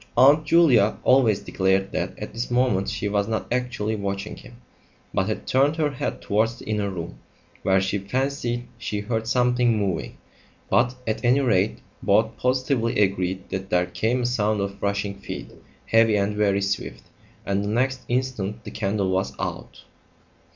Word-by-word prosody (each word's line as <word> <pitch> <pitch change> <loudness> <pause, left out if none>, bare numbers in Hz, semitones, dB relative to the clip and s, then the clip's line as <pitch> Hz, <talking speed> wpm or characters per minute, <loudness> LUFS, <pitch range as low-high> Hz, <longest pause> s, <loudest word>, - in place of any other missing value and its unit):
Aunt 145 +5 +6
Julia 130 -12 +5
always 115 -6 +4
declared 95 0 0
that - - -3
at - - -7
this 115 +2 -3
moment 120 -6 +1
she 105 - -2
was 100 0 0
not 110 -1 -2
actually 125 -4 -1
watching 100 0 -4
him, 125 -2 -14 0.6
but 95 - +1
had 110 - -3
turned 140 +4 +3
her 155 -2 0
head 135 - -4
towards 115 +2 +1
the - - -12
inner 105 -2 -1
room, 85 -4 -6 0.4
where 95 0 +3
she 95 +2 -1
fancied 120 +2 -2
she 105 -3 -3
heard 110 +1 -2
something 125 -1 +2
moving; 95 - -2 0.5
but, 125 +1 +3
at 110 +2 -2
any 125 +3 +4
rate, 110 -6 +1 0.2
both 110 +3 +2
positively 125 -3 0
agreed 95 -1 0
that 95 0 -4
there 90 0 +2
came 120 +6 -1
a - - 0
sound 110 -3 +1
of 100 0 -4
rushing 100 0 -1
feet, - - -7 0.3
heavy 115 -1 +4
and 100 +1 0
very 100 -1 +2
swift 100 0 -3 0.4
and 100 0 0
the 100 - -2
next 130 +4 0
instant 120 -4 -2
the - - -8
candle 100 -3 -1
was 95 +1 0
out! - - -5
110 Hz, 165 wpm, -24 LUFS, 100-125 Hz, 0.6 s, Aunt